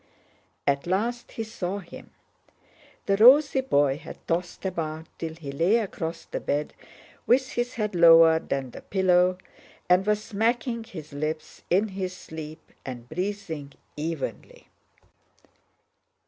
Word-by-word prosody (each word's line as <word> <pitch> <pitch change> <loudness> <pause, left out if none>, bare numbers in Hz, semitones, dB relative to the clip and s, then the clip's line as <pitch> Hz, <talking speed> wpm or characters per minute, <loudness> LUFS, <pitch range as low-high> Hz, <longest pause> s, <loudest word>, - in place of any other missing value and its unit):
At 140 +2 +1
last 230 +7 -1
he 225 - -3
saw 200 -3 -4
him: 190 -4 -11 1.0
the 195 - +2
rosy 265 +4 +7
boy 145 - +2
had 160 - -10
tossed 175 +3 -2
about 160 -3 -3
till 160 -1 -4
he 150 -4 -7
lay 170 +10 +2
across 170 -6 -4
the - - -4
bed 145 +1 -2 0.5
with 260 +2 +4
his 240 +1 -2
head 210 -3 -2
lower 165 -1 +7
than 135 -5 -3
the - - -10
pillow, 185 -1 +3 0.5
and 180 +1 +5
was 210 0 +1
smacking 230 +2 -1
his 155 -8 -10
lips 155 +2 -4
in 200 +5 +3
his 185 -1 -4
sleep 160 -1 -9
and 125 -2 -7
breathing 180 -5 -4 0.2
evenly. 155 -1 -5
180 Hz, 130 wpm, -26 LUFS, 155-210 Hz, 1.0 s, rosy